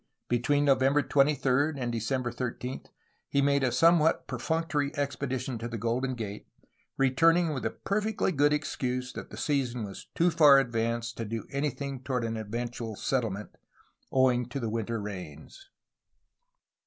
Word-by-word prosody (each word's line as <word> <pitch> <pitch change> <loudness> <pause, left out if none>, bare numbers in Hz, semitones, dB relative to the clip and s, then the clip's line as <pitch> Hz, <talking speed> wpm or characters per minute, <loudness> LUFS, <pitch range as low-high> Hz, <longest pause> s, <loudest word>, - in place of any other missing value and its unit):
Between 145 +5 +2
November 135 +1 +4
23 140 +1 +2
and 120 -2 -2
December 120 +2 -1
13 125 +1 -5 0.4
he 140 - +1
made 140 0 +3
a 130 - +2
somewhat 165 +4 +4
per 125 -3 -5
functory 160 0 0
expedition 130 -3 -2
to 115 - -4
the 115 -1 -5
Golden 125 +4 -1
Gate, 105 -3 -6 0.5
returning 165 +5 +3
with 135 - -3
the - - 0
perfectly 210 0 -1
good 145 -2 +3
excuse 125 -4 -2
that - - -7
the - - -10
season 125 -5 -1
was 100 -2 -8
too 175 +1 +3
far 150 -4 +7
advanced 115 -2 -1
to 115 - -3
do 110 0 -4
anything 140 -1 -3
toward 130 -2 -2
an 115 0 -2
eventual 115 +1 -4
settlement, 105 -4 -2 0.6
owing 125 -2 +3
to 140 +2 -4
the 115 -4 -3
winter 115 0 -2
rains. 95 - -8
130 Hz, 150 wpm, -29 LUFS, 115-145 Hz, 0.6 s, far